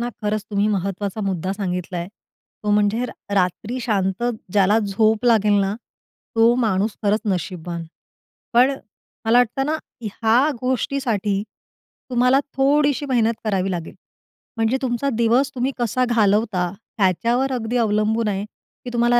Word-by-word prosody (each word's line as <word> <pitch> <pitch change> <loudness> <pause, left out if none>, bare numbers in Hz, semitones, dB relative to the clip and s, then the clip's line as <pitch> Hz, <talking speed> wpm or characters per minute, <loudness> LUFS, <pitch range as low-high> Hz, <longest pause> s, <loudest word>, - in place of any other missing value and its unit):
ना 240 - -1
खरंच 210 0 -1
तुम्ही 205 0 +1
महत्त्वाचा 200 +1 -2
मुद्दा 185 0 -2
सांगितला 180 -2 -3
आहे, 170 - -4 0.5
तो 210 - -1
म्हणजे 210 +3 +2
र - - -7 0.2
रात्री 200 +6 0
शांत 195 -3 -1 0.3
ज्याला 205 +1 +4
झोप 215 +2 +1
लागेल 210 -4 +4
ना, 195 +1 0 0.6
तो 230 +1 +5
माणूस 205 0 0
खरंच 210 +1 +2
नशीबवान. 175 -1 -4 0.7
पण 250 +3 +5 0.5
मला 225 +2 +4
वाटतं 245 +2 +2
ना 310 +2 0 0.2
ह्या 230 +5 +2
गोष्टीसाठी 240 -6 0 0.7
तुम्हाला 250 +2 +3 0.2
थोडीशी 285 +1 +2
मेहनत 230 -3 +2
करावी 195 -3 0
लागेल. 170 -3 -5 0.6
म्हणजे 225 +3 +2
तुमचा 255 +1 -1
दिवस 240 +4 +3
तुम्ही 255 +2 0
कसा 245 +1 +1
घालवता 210 -5 +2 0.3
त्याच्यावर 230 +7 +1
अगदी 245 -1 -1
अवलंबून 220 0 +1
आहे 200 -1 -1 0.4
की - - -4
तुम्हाला 240 0 +3
220 Hz, 135 wpm, -21 LUFS, 200-245 Hz, 0.7 s, तो